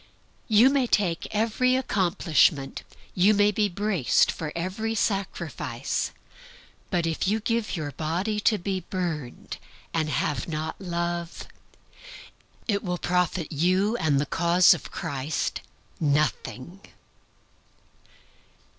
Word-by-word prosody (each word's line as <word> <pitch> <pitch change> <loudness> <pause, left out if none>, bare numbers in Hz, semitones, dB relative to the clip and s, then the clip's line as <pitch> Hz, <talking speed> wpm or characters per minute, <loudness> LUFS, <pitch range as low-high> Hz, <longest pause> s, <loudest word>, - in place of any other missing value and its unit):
You 230 +4 +6
may 275 -3 +2
take 180 -7 +1
every 230 +4 +1
accomplishment; 175 - +1 0.3
you 195 +4 +4
may 205 +1 +4
be 210 0 +1
braced 195 - +2
for 155 -2 -5
every 195 +6 -2
sacrifice; 200 -2 -2 0.8
but 175 -3 0
if 165 +2 -1
you 215 +3 +2
give 230 -1 -1
your 150 -3 -4
body 175 - -2
to 215 +1 +3
be 190 +1 -2
burned, 165 -8 -5 0.4
and 155 -2 0
have 145 0 -1
not 160 +2 -4
Love, 170 -1 -3 1.2
it 200 -3 0
will 180 -2 -2
profit 180 -2 0
you 185 +8 +2
and 145 -7 +2
the 145 - 0
cause 170 +3 +5
of 175 - -7
Christ 140 +2 -3 0.4
nothing. 150 +2 -1
180 Hz, 110 wpm, -26 LUFS, 160-210 Hz, 1.2 s, You